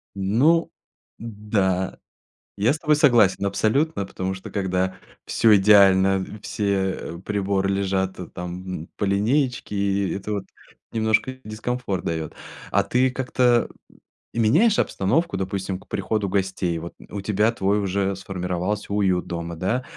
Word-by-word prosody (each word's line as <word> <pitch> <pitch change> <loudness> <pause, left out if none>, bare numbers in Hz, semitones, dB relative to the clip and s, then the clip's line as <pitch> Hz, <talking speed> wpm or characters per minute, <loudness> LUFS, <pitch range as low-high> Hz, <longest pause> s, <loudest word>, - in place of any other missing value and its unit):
Ну. 125 - +2 0.5
Да, 100 -4 -1 0.6
я 110 +7 +3
с - - -4
тобой 150 -2 +2
согласен 115 -10 +4
абсолютно, 110 +4 +1
потому 95 0 -4
что 95 - -9
когда 95 -2 -1 0.3
всё 110 -2 +4
идеально, 95 -1 +5 0.2
все 95 -4 -2
приборы 100 -1 0
лежат, 95 -1 -1
э, 90 - -6
там 90 -1 -6
по 105 - 0
линеечке, 120 +4 0
и 100 -1 0
это 100 +2 -4
вот 100 - -2 0.5
немножко 110 +3 +1
дискомфорт 110 -2 -3
дает. 80 -2 -3 0.4
А 100 0 +3
ты 125 +6 +2
как-то, 125 -2 +2 0.4
м, 115 - -5
меняешь 210 - +4
обстановку, 165 - +1
допустим, 95 0 -3
к - - -21
приходу 100 +1 -1
гостей. 95 -3 -1
Вот. 85 +1 -7 0.2
У 100 - -5
тебя 105 +2 +2
твой 100 -2 0
уже 100 0 0
сформировался 95 +2 -3
уют 95 -3 +1
дома, 85 0 -5
да, 95 +10 -1
100 Hz, 130 wpm, -23 LUFS, 95-110 Hz, 0.6 s, идеально